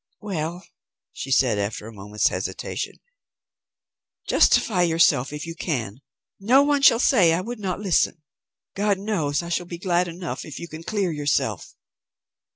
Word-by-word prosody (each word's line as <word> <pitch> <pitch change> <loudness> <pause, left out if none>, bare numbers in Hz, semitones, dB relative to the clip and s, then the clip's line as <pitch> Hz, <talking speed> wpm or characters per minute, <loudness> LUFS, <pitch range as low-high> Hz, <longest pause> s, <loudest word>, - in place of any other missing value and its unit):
"Well," 175 -3 -4 0.5
she 135 - -6
said 130 -6 +3
after 105 +1 -3
a 115 - -9
moment's 105 +1 0
hesitation, - - -4 1.3
"justify 190 -5 +3
yourself 160 -6 +3
if 150 +1 -6
you 165 - -6
can. 130 - -4 0.4
No 250 +8 +5
one 285 -1 +2
shall 230 - +7
say 200 -9 +4
I 175 - -1
would 235 +3 -6
not 190 -3 -3
listen. 180 -5 +1 0.5
God 205 0 +1
knows 175 -7 -1
I 170 - -7
shall 175 0 -2
be 175 - -6
glad 180 0 +1
enough 175 +1 -6
if 155 - -9
you 170 - -7
can 155 0 -9
clear 195 0 -1
yourself." 145 -2 -1
170 Hz, 155 wpm, -23 LUFS, 145-195 Hz, 1.3 s, shall